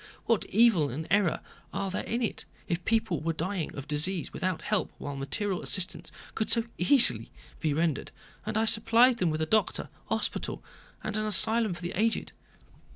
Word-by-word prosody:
What 230 -3 +1
evil 205 -9 +3
and 150 +6 -5
error 195 -3 +2 0.3
are 195 -1 -3
there 185 - -2
in 235 +2 -2
it, 225 - -2 0.2
if 175 -2 -2
people 220 -7 0
were 165 +1 -1
dying 170 +2 -3
of 140 0 -7
disease 155 +4 0
without 185 -3 -2
help 210 -4 -1
while 145 -1 -6
material 175 +8 -1
assistance 185 -1 +1 0.2
could 220 - -2
so 230 - +5 0.2
easily 235 +9 +4 0.3
be 155 - 0
rendered, 160 -1 -1 0.3
and 215 +1 -3
I 220 - +2
supplied 230 +3 +4
them 180 - +2
with 155 0 -2
a - - 0
doctor, 215 +6 0 0.2
a - - +2
hospital, - - -3 0.4
and 215 -1 -2
an 215 - -1
asylum 220 0 +3
for 170 - -11
the 175 - -3
aged? 225 +4 0
190 Hz, 180 wpm, -28 LUFS, 165-220 Hz, 0.4 s, so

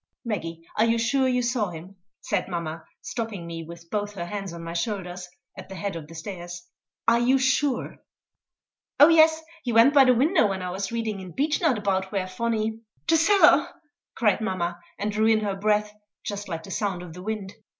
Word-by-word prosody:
"Maggie, 165 -7 -4
are 220 - +5
you 230 0 +2
sure 260 +4 +2
you 250 -1 +1
saw 235 -4 0
him?" 175 +3 -10 0.3
said 200 -3 -1
mamma, 165 -2 -4 0.2
stopping 220 -7 -4
me, 165 0 -6
with 170 +1 -11
both 205 -1 -2
her 170 -3 -4
hands 195 0 -5
on 170 0 -8
my 165 0 -5
shoulders, 180 -1 -3 0.3
at 190 - -10
the 190 - -7
head 200 0 -3
of 160 -3 -7
the 165 - -12
stairs 175 0 -7 0.4
"are 235 +1 +5
you 250 +3 +4
sure?" 260 +1 0 1.0
"Oh 290 - +9
yes; 320 -1 +5 0.2
he 245 - -2
went 230 +5 +6
by 275 -2 +7
the 255 -1 +5
window 300 - +4
when 190 -2 -3
I 180 - -3
was 195 +2 -3
reading 225 -3 -2
in 185 -3 -9
Beechnut 295 -1 +1
about 190 -2 -1
where 195 -3 -1
Phonny 220 +2 -2
" - - -42
"The 330 - +6
cellar!" 390 +5 +5 0.5
cried 210 -2 +2
mamma, 175 -4 -2 0.2
and 210 +1 -2
drew 215 +1 +2
in 220 -1 +4
her 205 -2 -1
breath 210 +1 +1 0.3
just 205 -1 -5
like 165 -2 -4
the 195 - -9
sound 195 -3 -2
of 170 -3 -10
the 180 - -9
wind. 205 -1 -4
205 Hz, 200 wpm, -25 LUFS, 180-235 Hz, 1.0 s, Oh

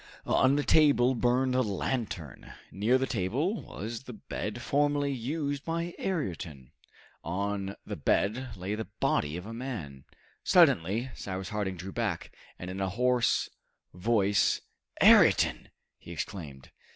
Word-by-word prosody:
On 130 +1 +4
the 145 - +1
table 140 -6 +5
burned 125 +1 +2
a 130 - +3
lantern. 100 - -3 0.2
Near 110 +6 +2
the 130 - 0
table 135 - -1
was 110 +3 -6
the 125 - -8
bed 110 +1 -5
formerly 145 +2 +1
used 140 +3 -3
by 170 +1 -2
Ayrton. 85 - -4 0.5
On 100 +3 -2
the - - -4
bed 115 +2 0
lay 95 +3 -3
the 110 +1 -4
body 75 +3 +1
of 90 - -7
a 115 - -7
man. 105 - -6 0.4
Suddenly 110 +10 +4
Cyrus 95 -1 -5
Harding 100 -3 -2
drew 95 +3 -7
back, 110 -7 -3 0.2
and 90 0 -6
in 95 +1 -5
a 95 - 0
hoarse 125 +3 +2 0.5
voice, 100 +1 +2 0.4
"Ayrton!" - - +5 0.3
he - - -11
exclaimed. 70 -8 -6
110 Hz, 135 wpm, -29 LUFS, 95-130 Hz, 0.5 s, table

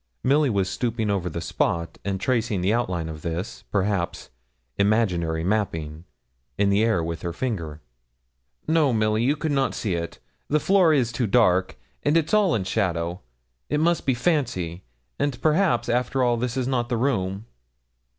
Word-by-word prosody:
Milly 145 +2 +3
was 100 -4 +1
stooping 115 -1 -1
over 95 -3 -1
the 85 +1 -5
spot, 85 0 -1
and 95 -1 -2
tracing 115 -3 0
the 95 +4 +2
outline 90 -9 -1
of 80 -1 -7
this, 90 +8 -5
perhaps, 100 -3 -1 0.4
imaginary 90 -6 +1
mapping, 85 -5 -2 0.5
in 100 0 +3
the 100 +2 +3
air 110 -7 +2
with 85 0 -4
her 85 - -3
finger. 85 - -4 0.9
'No, 155 -3 +3
Milly, 110 0 +1
you 135 +5 +2
could 155 +1 -2
not 135 -1 +1
see 105 -5 -2
it: 85 0 -4 0.3
the 150 - +2
floor 185 0 +4
is 130 -6 +2
too 115 0 -1
dark, 95 - +3 0.2
and 145 +3 +3
it's 160 +2 0
all 210 -5 +4
in 105 - 0
shadow. 90 -3 -1 0.5
It 150 - +1
must 170 0 +1
be 130 - +3
fancy; 115 - -1 0.4
and 145 -3 -1
perhaps, 155 -7 +2
after 125 +2 +1
all, 120 -1 +3
this 125 +1 -2
is 130 - 0
not 125 -2 0
the 120 - 0
room.' 105 -5 -1
110 Hz, 170 wpm, -24 LUFS, 90-130 Hz, 0.9 s, floor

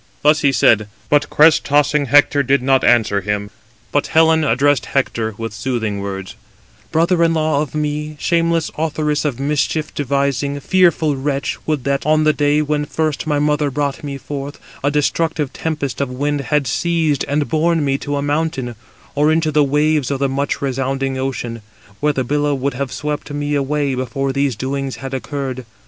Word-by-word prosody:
Thus 150 +1 +4
he 140 - +4
said, 110 -4 +3 0.2
but 145 0 +2
crest 160 +2 +5
tossing 145 0 +2
Hector 145 +2 +4
did 135 -1 +1
not 135 0 +3
answer 110 -4 +3
him. 105 +1 -3 0.4
But 145 - +1
Helen 160 0 +4
addressed 135 0 +2
him - - -12
[Hector] 115 -5 0
with 115 -1 -5
soothing 110 -3 -2
words: 95 -1 -5 0.6
"Brother 170 +2 +2
in 165 0 +2
law 155 -2 +1
of 150 0 -5
me, 150 0 -2
shameless 170 -1 +1
authoress 150 -1 -1
of 135 -4 -2
mischief 150 +2 -1
devising, 140 0 -1
fearful 170 -1 +2
wretch, 140 +1 -2
would 150 -4 0
that, 140 0 0
on 155 +1 +3
the 155 0 +4
day 150 +1 +2
when 150 0 -1
first 155 0 -2
my 150 -1 +1
mother 150 0 +1
brought 140 +1 -2
me 140 -2 -4
forth, 140 +1 -6 0.3
a 145 - +3
destructive 150 0 0
tempest 145 -5 -3
of 140 - -1
wind 145 +3 -1
had 150 -2 +2
seized 160 +2 0
and 145 +1 0
borne 160 -1 +1
me 135 0 0
to 145 0 -3
a 140 - -2
mountain, 145 -4 -1 0.4
or 150 +2 +3
into 160 -1 +1
the 150 0 +4
waves 150 0 +1
of 140 - -1
the 140 +1 +1
much 140 +1 -2
resounding 135 0 -1
ocean, 120 -3 -4 0.4
where 150 +1 +2
the 135 -2 -1
billow 145 +2 0
would 135 +1 -2
have 130 0 -4
swept 150 -1 -4
me 145 0 -2
away 145 0 0
before 130 +2 -2
these 140 -2 0
doings 135 +3 -3
had 135 0 -7
occurred. 130 -1 -4
145 Hz, 180 wpm, -18 LUFS, 135-150 Hz, 0.6 s, crest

